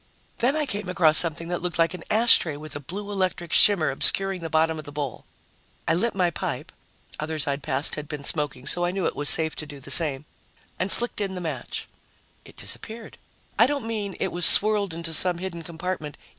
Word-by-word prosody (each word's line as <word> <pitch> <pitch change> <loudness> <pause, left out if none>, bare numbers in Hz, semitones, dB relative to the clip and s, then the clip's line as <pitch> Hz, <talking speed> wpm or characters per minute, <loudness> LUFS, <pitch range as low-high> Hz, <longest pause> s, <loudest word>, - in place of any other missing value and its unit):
Then 255 +5 +2
I 310 -1 0
came 205 -7 -3
across 160 -4 +4
something 165 0 0
that 175 - -3
looked 175 -2 -3
like 165 0 +2
an 180 -2 -8
ashtray 215 -8 +4
with 155 +1 -9
a - - -4
blue 200 +8 -7
electric 185 -3 -2
shimmer 170 -8 +5
obscuring 195 +6 +4
the 165 - -5
bottom 160 0 +1
of 155 - -9
the 145 - -9
bowl. 145 -4 -5 0.6
I - - +3
lit 210 +7 -1
my 180 -3 +1
pipe - - -5 0.5
others 155 -1 -2
I'd 140 0 -3
passed 135 +2 0
had 150 -1 -4
been 150 -1 -7
smoking, 145 -4 +1
so 175 - 0
I 175 - +1
knew 185 0 -3
it - - -1
was 145 +1 0
safe 160 -1 +1
to 155 - -5
do 145 -1 -10
the 140 +1 -7
same 145 -1 +3 0.5
and 185 +2 -1
flicked 240 -2 -1
in 195 -2 -3
the - - -4
match. 155 -8 -5 0.6
It - - -17
disappeared. 225 0 -5 0.4
I 230 - +7
don't 280 -4 -3
mean 210 -4 -4
it - - -2
was 175 0 -2
swirled 205 -2 +5
into 165 -1 -4
some 180 +2 +1
hidden 175 -2 -6
compartment. 165 -2 -6
170 Hz, 210 wpm, -24 LUFS, 155-195 Hz, 0.6 s, I